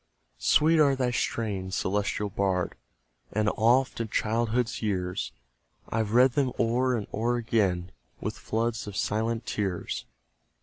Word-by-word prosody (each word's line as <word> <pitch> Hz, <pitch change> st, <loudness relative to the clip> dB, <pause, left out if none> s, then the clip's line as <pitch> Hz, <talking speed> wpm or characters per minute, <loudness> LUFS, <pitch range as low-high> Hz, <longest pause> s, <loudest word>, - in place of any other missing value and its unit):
Sweet 160 Hz, +1 st, +4 dB
are 140 Hz, -3 st, +5 dB
thy 125 Hz, -2 st, 0 dB
strains, 100 Hz, -6 st, -2 dB
celestial 105 Hz, +1 st, -1 dB
Bard; 95 Hz, -2 st, 0 dB, 0.6 s
And 105 Hz, 0 st, +2 dB
oft, 120 Hz, +4 st, +2 dB
in 115 Hz, -, -2 dB
childhood's 115 Hz, +2 st, 0 dB
years, 95 Hz, -4 st, -2 dB, 0.6 s
I've 110 Hz, -1 st, -1 dB
read 125 Hz, +1 st, +6 dB
them 130 Hz, 0 st, +1 dB
o'er 125 Hz, +2 st, +2 dB
and 105 Hz, -, -4 dB
o'er 115 Hz, +3 st, +1 dB
again, 100 Hz, -6 st, 0 dB, 0.3 s
With -, -, -3 dB
floods 115 Hz, 0 st, -2 dB
of 100 Hz, -1 st, -6 dB
silent 115 Hz, +2 st, -1 dB
tears. 95 Hz, -4 st, -2 dB
110 Hz, 130 wpm, -28 LUFS, 100-120 Hz, 0.6 s, read